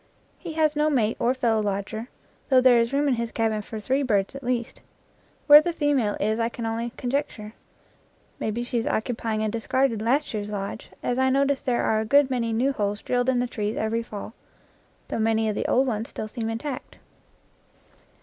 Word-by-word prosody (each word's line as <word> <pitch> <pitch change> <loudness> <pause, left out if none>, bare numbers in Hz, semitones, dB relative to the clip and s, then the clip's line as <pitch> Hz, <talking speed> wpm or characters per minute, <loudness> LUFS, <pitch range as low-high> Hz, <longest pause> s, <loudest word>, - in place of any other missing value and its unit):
He 335 -3 -7
has 310 -1 +2
no 300 +1 +2
mate 230 -7 +1
or 250 +2 +2
fellow 230 -4 +1
lodger, 210 +3 -3 0.4
though 260 -2 +6
there 250 -2 +6
is 230 +1 +1
room 285 +1 +1
in 275 - +3
his 235 -1 -2
cabin 220 -1 0
for 215 +1 -7
three 260 +6 0
birds 205 -6 +1
at 275 0 -8
least. 240 -1 -2 0.6
Where 295 0 +10
the 345 - -1
female 285 -9 +1
is 215 +2 0
I 230 0 +1
can 235 -1 -6
only 225 +1 -2
conjecture; 245 -5 -3 0.9
maybe 220 +2 -2
she 240 0 -1
is 225 - -3
occupy 225 -1 -1
ing 215 - -1
a 215 - 0
discarded 230 +1 0
last 265 +6 +1
year's 210 -1 -3
lodge, 205 +1 -5
as 245 +1 0
I 260 0 +3
notice 275 +1 +2
there 250 -4 0
are 215 - +2
a 220 - -1
good 280 +3 +4
many 235 -3 0
new 255 +5 +1
holes 205 -3 -2
drilled 245 0 +1
in 260 - +2
the 245 - +1
trees 215 -3 -3
every 220 +1 0
fall, 215 -1 -8 0.8
though - - -2
many 220 0 +2
of 215 - 0
the - - -2
old 260 +2 +3
ones 225 -2 -2
still 215 - -5
seem 225 0 -4
intact. 250 +4 -5
235 Hz, 205 wpm, -25 LUFS, 220-260 Hz, 0.9 s, Where